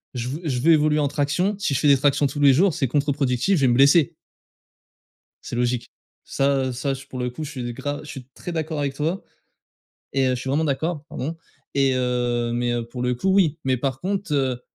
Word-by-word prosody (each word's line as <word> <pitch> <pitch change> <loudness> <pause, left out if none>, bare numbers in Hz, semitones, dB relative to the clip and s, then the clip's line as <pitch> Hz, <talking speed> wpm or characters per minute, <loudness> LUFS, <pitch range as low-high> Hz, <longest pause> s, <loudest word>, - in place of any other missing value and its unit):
je 125 +1 -3
veux 150 +6 -5
je 125 - -1
veux 165 +3 +5
évoluer 155 -1 +4
en 145 -1 +2
traction, 150 +9 0
si 150 -9 0
je - - +1
fais 150 - +2
des 140 -1 +6
tractions 145 +1 +2
tous 145 +1 -2
les 140 -1 +6
jours, 170 +6 +3
c'est 135 - 0
contre-productif, 140 +4 +1
je 145 - -1
vais 130 - +4
me 120 - +3
blesser. 140 +3 +5 1.3
C'est - - -6
logique. 120 0 -1 0.3
Ça, 140 0 +1
heu, - - -2
ça, 130 +3 -2
je 135 +1 -8
pour 130 - -7
le 125 0 -1
coup, 140 +6 -7
je 145 - -6
suis 120 -2 -5
gra 145 +3 -4
je 150 - -11
suis 130 -2 -8
très 175 - -7
d'accord 160 -2 -3
avec 140 -1 -1
toi 160 +7 -2 0.9
et 135 -1 +2
heu, - - +2
je 125 - -4
suis 130 - -5
vraiment 150 +4 +1
d'accord, 155 +2 -2
pardon 160 +3 -4 0.4
et 135 -1 +3
heu 120 -2 0
mais 120 0 0
heu, 120 -1 -2
pour 125 +1 -6
le 125 0 +1
coup, 125 +11 -2
oui. 170 -6 +3
Mais 130 -1 +2
par 130 +1 -3
contre, 195 -3 -2
heu, 130 -3 0
140 Hz, 235 wpm, -23 LUFS, 125-150 Hz, 1.3 s, des